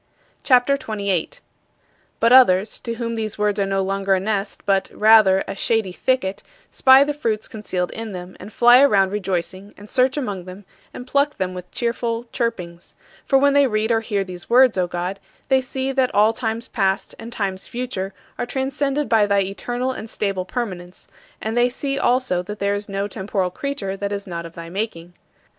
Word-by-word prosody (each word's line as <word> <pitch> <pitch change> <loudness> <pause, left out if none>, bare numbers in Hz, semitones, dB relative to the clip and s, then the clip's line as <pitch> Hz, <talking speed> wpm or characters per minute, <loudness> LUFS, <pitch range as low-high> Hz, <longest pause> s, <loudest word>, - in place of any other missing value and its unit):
CHAPTER 255 +1 +4
XXVIII 260 -5 -6
38. 200 -5 -2 0.8
But 230 +2 +4
others, 210 -6 +5
to 230 -1 -5
whom 230 0 -3
these 220 -2 -4
words 210 -1 0
are 195 - +1
no 195 0 0
longer 195 0 +1
a - - 0
nest 200 0 -3
but, 195 -1 +1
rather, 215 -3 +5
a - - -4
shady 220 -1 0
thicket, 200 -1 -1 0.3
spy 265 +1 +6
the 295 +1 -2
fruits 225 -7 -2
concealed 185 -5 -3
in 225 -1 -6
them 180 -1 -8
and 210 - -10
fly 240 +3 +6
around 195 -8 +4
rejoicing 190 0 -4
and 205 - -12
search 260 +2 +2
among 205 -10 -3
them 185 +2 -11 0.3
and 250 - -9
pluck 280 +2 +1
them 185 -1 -2
with 180 0 -8
cheerful 235 -1 -2
chirpings: 180 -8 -4 0.3
For 270 - +4
when 280 +1 +4
they 285 -1 +5
read 215 0 0
or 225 - +3
hear 205 -3 -1
these 180 -2 -10
words, 250 0 +5
O 180 -2 +1
God, 180 +3 -4 0.3
they 265 -1 +4
see 260 +1 -3
that 260 -1 0
all 210 +2 +5
times 225 0 -3
past 190 0 -1
and 230 +1 -8
times 195 -4 -3
future 240 -6 -4 0.3
are - - -2
transcended 275 +2 -1
by 220 -3 +3
thy 200 -1 +3
eternal 245 +6 -3
and 225 -3 -7
stable 195 -4 -2
permanence, 185 -6 -6 0.3
and 220 +1 -3
they 240 +1 +3
see 275 +2 -3
also 245 -8 +1
that 210 +3 -7
there 200 0 0
is 205 0 -4
no 195 +1 -2
temporal 190 -2 -2
creature 210 -5 -4
that 200 +1 -4
is 200 -1 -4
not 170 -2 -5
of 165 - -15
thy 165 0 -9
making. 175 -2 -5
210 Hz, 190 wpm, -21 LUFS, 190-245 Hz, 0.8 s, spy